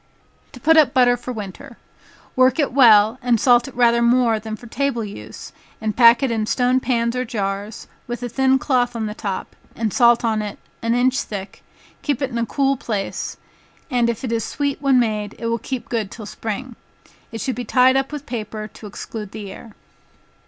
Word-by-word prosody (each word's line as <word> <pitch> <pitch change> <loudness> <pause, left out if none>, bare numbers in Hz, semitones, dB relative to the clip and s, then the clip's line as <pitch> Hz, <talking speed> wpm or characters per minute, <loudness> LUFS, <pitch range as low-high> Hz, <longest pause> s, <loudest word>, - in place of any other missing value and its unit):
To 250 - -11
put 320 +5 +4
up 295 -3 +5
Butter 245 -1 +5
for 245 +1 -7
Winter. 225 +4 -8 0.6
Work 255 0 +4
it 290 -6 0
well, 225 -3 +6
and 245 -2 +2
salt 240 0 +4
it 270 - -11
rather 235 -1 +4
more 235 -2 +3
than 215 0 -6
for 240 - -14
table 240 -1 -2
use, 110 - -9 0.3
and 215 -1 -2
pack 235 +2 +6
it 265 - +1
in 220 -2 -1
stone 250 +2 +2
pans 235 -2 0
or 250 - 0
jars, 205 -1 -4 0.2
with 240 0 -5
a - - -1
thin 265 +2 +3
cloth 245 -3 0
on 225 -1 -2
the 210 - -4
top, 200 -3 -5 0.2
and 220 -3 -2
salt 235 -2 +4
on 220 -1 +1
it 210 -1 -6 0.2
an 230 +1 +1
inch 255 +1 +2
thick, 195 -2 -7 0.4
keep 285 -5 -1
it 270 -2 -2
in 235 - -2
a 230 - -1
cool 275 +1 +1
place, 210 -5 -4 0.5
and 240 -2 +2
if 235 +1 -3
it 245 - -3
is 230 -1 0
sweet 285 +2 -2
when 270 -3 +4
made, 215 -3 -1
it - - -7
will 230 0 0
keep 260 +1 -5
good 220 -4 -2
till 215 0 -9
spring. 225 +4 -5 0.6
It 225 - -6
should 260 - -2
be 245 - -4
tied 255 +3 +4
up 270 +1 0
with 295 -1 -6
paper 215 -3 -5
to 210 - -11
exclude 210 0 -7
the 210 -3 -7
air. 220 +2 -12
235 Hz, 205 wpm, -21 LUFS, 215-255 Hz, 0.6 s, well